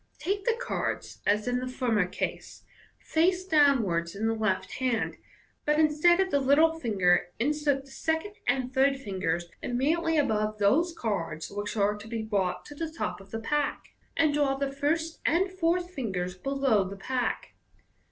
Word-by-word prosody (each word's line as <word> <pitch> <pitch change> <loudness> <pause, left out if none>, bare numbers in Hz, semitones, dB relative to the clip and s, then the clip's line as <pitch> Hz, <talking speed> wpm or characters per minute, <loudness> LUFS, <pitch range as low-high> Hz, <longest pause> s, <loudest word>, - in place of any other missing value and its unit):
Take 400 +1 -2
the 470 -1 +2
cards, 485 - -3
as 210 +3 +2
in 245 0 +1
the 255 - -4
former 235 -7 +1
case, - - -5 0.3
face 360 +3 +1
downwards 235 - +3
in 215 +3 -2
the 225 - +2
left 215 -4 -1
hand, 250 -3 0 0.5
but 300 0 +2
instead 315 +3 +4
of 380 -1 +1
the 285 - +3
little 310 +4 +4
finger, 185 - +2
insert 285 +1 0
the 270 - -16
second 320 +8 -2
and 255 0 0
third 275 +1 +3
fingers 185 -7 -2 0.2
immediately 315 +6 +1
above 215 -6 +1
those 270 - +3
cards 165 -8 -3
which 205 +2 -4
are 205 0 +2
to 210 +1 -10
be 225 -1 -3
brought 195 -4 -1
to - - -10
the 320 +2 -4
top 315 - -4
of 195 - -16
the 225 - -4
pack, 295 +5 -1 0.3
and 315 -3 +3
draw 285 -2 +2
the 275 0 -1
first 320 +4 -1
and 370 +4 +2
fourth 355 0 0
fingers 190 - -3
below 270 -1 +1
the 195 +1 -7
pack. 250 +4 -2
265 Hz, 170 wpm, -28 LUFS, 210-315 Hz, 0.5 s, instead